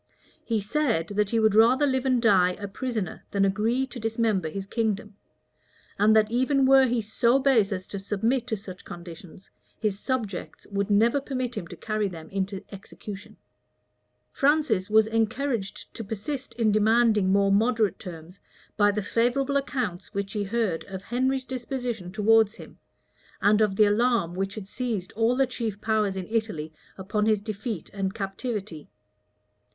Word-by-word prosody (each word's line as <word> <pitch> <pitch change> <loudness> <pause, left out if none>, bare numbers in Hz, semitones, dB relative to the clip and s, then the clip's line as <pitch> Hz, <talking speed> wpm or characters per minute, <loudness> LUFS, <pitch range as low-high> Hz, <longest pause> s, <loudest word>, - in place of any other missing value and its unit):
He 225 -2 0
said, 215 - 0
that 205 0 0
he 230 - +1
would 220 -2 +3
rather 240 +6 +5
live 260 -1 0
and 255 -2 +3
die 190 -6 +4
a 200 +2 -6
prisoner 220 -1 -4
than 200 -1 +2
agree 220 +7 +1
to 250 -1 -9
dismember 225 -6 0
his 195 +4 -5
kingdom; 215 -1 -2 0.8
and 215 +2 +5
that 215 0 +4
even 260 +3 +2
were 265 0 +6
he 235 -2 0
so 235 +4 +2
base 255 -7 +3
as 185 -1 -3
to 200 - -4
submit 225 +6 -1
to 220 - -1
such 190 -2 -10
conditions, 175 +1 -11 0.3
his 205 -2 -1
subjects 220 -7 -4
would 200 0 -1
never 230 +7 +3
permit 255 -3 -3
him 170 - -5
to - - -9
carry 215 -1 -2
them 165 -4 -9
into 195 0 -3
execution. 200 0 -10 0.9
Francis 275 -10 +2
was 220 0 +5
encouraged 225 -1 -2
to 225 - -6
persist 240 +7 -5
in 225 -3 +2
demanding 215 -2 +3
more 200 0 +3
moderate 220 0 +2
terms 175 +1 -10 0.4
by 205 -1 +4
the 205 0 -1
favorable 245 +6 +1
accounts 245 -9 -2
which 200 0 -3
he 205 -2 -1
heard 205 -5 -1
of 190 -1 -7
Henry's 260 +3 0
disposition 245 -7 -4
towards 220 +1 +3
him, - - -13 0.6
and 210 +1 +4
of 210 -3 +2
the 215 - +5
alarm 220 -4 +2
which 195 +2 -3
had 210 -3 -7
seized 220 -5 -3
all 225 +3 +1
the 270 +1 +3
chief 230 -5 -4
powers 215 -2 0
in 190 -1 -4
Italy 210 -9 -2 0.2
upon 210 +3 -1
his 215 -2 +3
defeat 215 -2 -5
and 195 0 -2
captivity. 195 - -5
215 Hz, 165 wpm, -26 LUFS, 195-240 Hz, 0.9 s, were